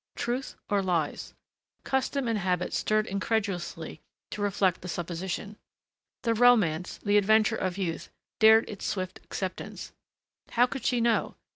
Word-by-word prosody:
Truth 250 +3 -3
or 205 -1 +1
lies? 170 -5 -2 0.5
Custom 265 0 0
and 225 -2 0
habit 180 -1 -1
stirred 215 0 +1
incredulously 200 -2 -2 0.3
to 210 - -5
reject 195 -3 +1
the 180 - -7
supposition. 180 +4 -4 0.7
The 230 -2 +2
romance, 210 -8 +3
the 205 0 +4
adventure 220 +2 +3
of 185 -3 -2
youth, 175 -4 -3 0.3
dared 220 0 +7
its 205 - -8
swift 185 -1 -3
acceptance. 185 -1 -5 0.6
How 240 +1 +5
could 265 +1 -6
she 245 -2 +2
know? 230 -1 +1
205 Hz, 135 wpm, -28 LUFS, 185-225 Hz, 0.7 s, dared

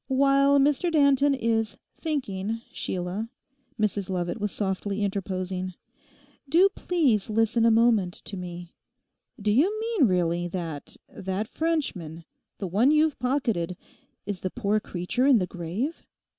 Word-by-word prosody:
'While 275 +1 +4
Mr 295 +5 +2
Danton 280 -2 +4
is 225 -3 0 0.2
"thinking," 225 - -3
Sheila,' 185 +5 -3 0.5
Mrs 205 -3 0
Lovat 180 +2 -2
was 210 -1 -1
softly 200 +1 -2
interposing, 185 -2 -3 0.7
'do 355 +7 +6
please 285 - +1
listen 225 +1 +2
a - - +6
moment 225 -5 +3
to 200 - -6
me. 175 -1 -7 0.7
Do 210 0 +1
you 360 - +3
mean 445 - +2
really 175 -2 +1
that 165 -5 -6
that 200 -4 -4
Frenchman—the 195 - -4
one 210 +9 +3
you've 305 0 +3
pocketed—is 205 -6 -3
the 185 - -3
poor 215 0 0
creature 200 +8 -1
in 270 -4 +7
the 185 - +1
grave? 185 - -4
215 Hz, 125 wpm, -26 LUFS, 185-275 Hz, 0.7 s, in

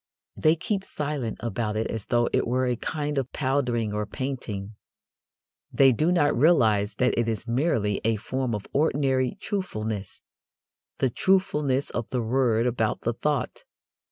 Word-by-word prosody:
They 155 +1 +3
keep 190 +4 -2
silent 145 - -3
about 110 -1 -2
it 110 - 0
as 110 -3 -4
though 120 -1 +2
it - - +2
were 130 +2 +1
a 125 -1 +1
kind 150 +2 -2
of 130 -1 -4
powdering 125 -6 0
or 105 0 -2
painting. 110 -5 -5 1.0
They 135 -1 +6
do 155 +8 +2
not 150 -5 +3
realize 110 -9 +3
that 125 +4 +2
it 120 - +1
is 110 0 -3
merely 115 - +1
a 115 0 +2
form 125 +2 -2
of 105 - -6
ordinary 135 -2 +1
truthfulness 110 - -4 0.7
the 130 - +1
truthfulness 150 - +1
of 120 - -3
the 125 -2 -1
word 115 -1 +2
about 115 -3 0
the 120 - -1
thought. 145 +3 -2
125 Hz, 155 wpm, -26 LUFS, 110-145 Hz, 1.0 s, They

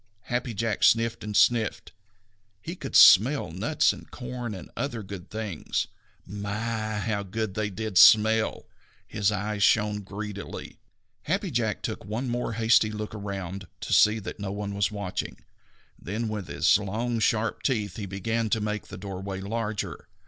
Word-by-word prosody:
Happy 120 0 -2
Jack 110 0 -1
sniffed 115 0 +3
and 105 -1 -2
sniffed. 115 -3 +2 0.7
He 165 - -6
could 140 -6 -7
smell 115 - +7
nuts 110 - +2
and - - -13
corn 125 -3 -6
and 95 - -10
other 120 -6 -3
good 95 -2 -9
things. 110 -7 -3 0.4
My, 110 +2 -3
how 105 0 -1
good 100 +1 -3
they 105 +1 -1
did 105 0 0
smell! 110 0 +6 0.4
His 105 0 0
eyes 105 0 -2
shone 105 0 +3
greedily. 100 +1 -7 0.5
Happy 190 +3 -1
Jack 115 -5 -1
took - - -4
one 110 +6 -3
more 120 -1 -2
hasty 110 -1 +4
look 105 0 -5
around 100 -2 -5
to - - -2
see 105 +1 +6
that 110 0 -7
no 100 -1 -4
one 100 0 -4
was 100 -1 +1
watching, 100 -3 -4 0.6
then 110 +5 -3
with 105 -4 -4
his 95 - +3
long 115 +4 -2
sharp 110 0 +1
teeth 105 -8 -1
he 105 -3 -5
began 110 +4 -2
to 110 - +1
make 105 0 -3
the - - -9
doorway 95 0 -5
larger. 105 +1 -4
105 Hz, 155 wpm, -27 LUFS, 100-115 Hz, 0.7 s, smell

